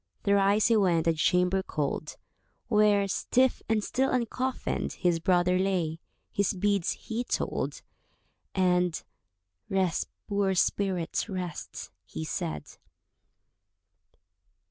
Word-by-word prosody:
Thrice 200 +1 +3
he 230 - +4
went 175 -5 +2
to 165 - +4
the - - -3
chamber 180 +4 +2
cold, 150 -2 -3 0.5
Where, 210 -2 +4
stiff 255 +6 +1
and 220 -2 +2
still 265 +4 0
uncoffinèd, 255 +1 -1
His 175 -3 +1
brother 180 +1 +2
lay, 175 -4 0 0.3
his 200 -1 +1
beads 200 -1 +1
he 235 +1 -4
told, - - -2 0.7
And 180 -2 +2 0.7
"Rest, 190 -4 0 0.2
poor 200 -2 +1
spirit, 185 -1 0
rest," 180 -4 -5
he 80 0 -6
said. 75 -2 -4
190 Hz, 105 wpm, -28 LUFS, 175-205 Hz, 0.7 s, he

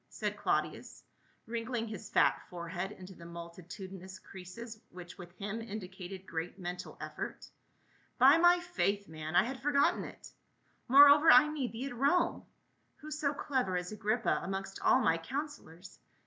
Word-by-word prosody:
said - - -3
Claudius, - - -2 0.4
wrinkling 230 0 -3
his 215 -2 -7
fat - - +3
forehead 175 +2 -5
into 185 -1 -11
the 170 - -14
mul 170 0 -8
titudinous 185 +2 -9
creases 215 +5 -10
which 175 -1 -10
with 175 -1 -10
him 210 +3 -4
indicated 190 -3 -8
great 165 +2 -5
mental 180 -1 -6
effort. - - -6 0.4
" - - -38 0.3
By 270 +5 +7
my 350 +1 +6
faith, 205 - -1
man, 155 +1 -6
I - - +6
had 260 +1 -5
forgotten 285 0 +2
it. - - -11 0.6
Moreover, 285 +4 +8
I 275 +5 +7
need 285 -5 -3
thee 235 +4 -4
at 275 - -6
Rome; 285 +8 +2 0.5
who 305 +1 -10
so 300 -1 0
clever 255 -11 -1
as 180 +2 -4
Agrippa 215 +2 0
amongst 195 0 -5
all - - +5
my 165 0 +2
counselors. 200 - -7
205 Hz, 155 wpm, -32 LUFS, 180-265 Hz, 0.6 s, Moreover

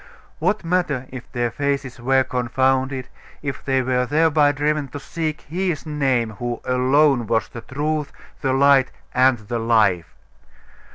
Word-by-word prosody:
What 190 +6 0
matter 165 -7 0
if 125 -2 -9
their 120 -1 -1
faces 140 -2 -2
were 130 +2 +3
confounded, 130 +1 0 0.4
if 140 -3 -4
they 130 -1 +1
were 125 0 0
thereby 150 0 +3
driven 150 +1 -1
to 145 +3 -8
seek 155 +1 -4
His 175 0 -3
Name, 135 -7 0
who 120 -1 -3
alone 130 0 +3
was 115 0 +1
the 115 - -8
Truth, 150 +4 -2 0.3
the 135 - +1
Light, 135 0 +4 0.2
and 130 0 +4
the 115 +2 -4
Life? 110 -7 +2
135 Hz, 145 wpm, -21 LUFS, 125-150 Hz, 0.4 s, Light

